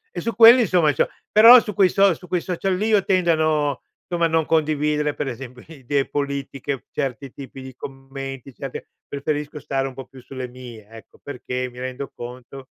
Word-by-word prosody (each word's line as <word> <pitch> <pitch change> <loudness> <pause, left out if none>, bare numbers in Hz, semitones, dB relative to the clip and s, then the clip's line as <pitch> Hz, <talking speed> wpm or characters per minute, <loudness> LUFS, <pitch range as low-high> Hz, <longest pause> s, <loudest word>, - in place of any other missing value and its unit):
e - - -3
su 230 -3 -3
quelli, 235 +2 +8
insomma, 170 - +2
c'ho - - +1 0.2
però 230 +4 +9
su 210 -2 -5
quei 185 -1 +4
so 195 -2 +4
su 180 +3 -13
quei 180 0 -1
social 185 +1 -2
lì 210 +4 -1
io 205 -3 +3
tendo 180 -3 +2
a - - +3
no 150 -3 0 0.3
somma, 170 -1 0
a - - +4
non 160 -1 +1
condividere 150 -1 0
per 145 - -3
esempio 125 0 -8
idee 140 -2 -2
politiche, 140 -1 -4
certi 135 0 -4
tipi 135 -1 -10
di 130 -1 -10
commenti, 135 -1 -8
certe 135 0 -8 0.2
preferisco 150 +1 -4
stare 135 -1 -2
un 130 - -8
po' 135 -2 -8
più 130 -1 -15
sulle 130 0 -7
mie, 120 -4 -11
ecco, 115 0 -15
perché 125 -2 -5
mi 125 - -12
rendo 130 +2 -6
conto 125 +2 -10
140 Hz, 195 wpm, -22 LUFS, 130-165 Hz, 0.3 s, però